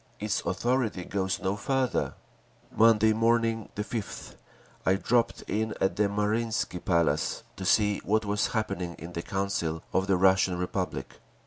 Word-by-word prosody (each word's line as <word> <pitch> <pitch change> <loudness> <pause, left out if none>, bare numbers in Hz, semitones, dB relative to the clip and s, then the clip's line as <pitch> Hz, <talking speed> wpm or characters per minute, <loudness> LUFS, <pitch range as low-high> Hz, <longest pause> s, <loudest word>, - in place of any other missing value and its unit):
Its 105 0 -1
authority 120 -7 0
goes 95 -1 -1
no 95 0 -1
farther…. 130 +4 0 0.6
Monday 110 -1 +5
morning, 115 0 +1
the 105 - -2
5th, 110 -1 -6 0.5
I 95 - +3
dropped 115 +4 +1
in 110 +1 -2
at 95 - +1
the 105 -1 +2
Marinsky 105 -2 -1
Palace, 85 -4 +1
to 95 - -6
see 105 +1 +3
what 110 +2 +1
was 105 0 +1
happening 100 -6 -2
in 85 +1 -9
the 85 - -3
Council 95 -4 -2
of 95 +1 +1
the 95 -2 +3
Russian 95 -1 +4
Republic. 90 -7 -3
100 Hz, 145 wpm, -28 LUFS, 95-110 Hz, 0.6 s, Monday